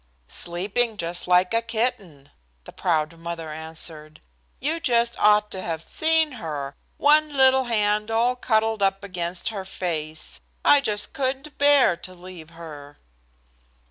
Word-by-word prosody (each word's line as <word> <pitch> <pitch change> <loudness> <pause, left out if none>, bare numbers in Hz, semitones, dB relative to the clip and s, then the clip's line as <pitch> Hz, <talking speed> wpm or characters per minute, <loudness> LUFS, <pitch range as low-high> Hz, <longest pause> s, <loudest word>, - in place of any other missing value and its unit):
"Sleeping 205 - -2
just 170 -1 -2
like 180 +2 +3
a 230 - +3
kitten," 215 - -3 0.3
the - - -11
proud 165 -2 -1
mother 165 -1 -6
answered. 155 -1 -7 0.4
"You 310 +5 -1
just 235 -5 +2
ought 210 0 +4
to 190 - -4
have 165 -2 -4
seen 320 - +2
her, 140 -4 -5 0.2
one 300 +1 +4
little 265 0 +5
hand 210 -2 +1
all 235 +3 +2
cuddled 220 -3 0
up 195 0 +1
against 180 -1 -3
her 205 -4 -5
face. 160 -5 -4 0.3
I 285 - +6
just 210 -6 -1
couldn't 270 +2 -3
bear 285 -9 +5
to 185 +1 -10
leave 175 -3 -11
her." 150 -4 -11
195 Hz, 140 wpm, -24 LUFS, 165-240 Hz, 0.4 s, I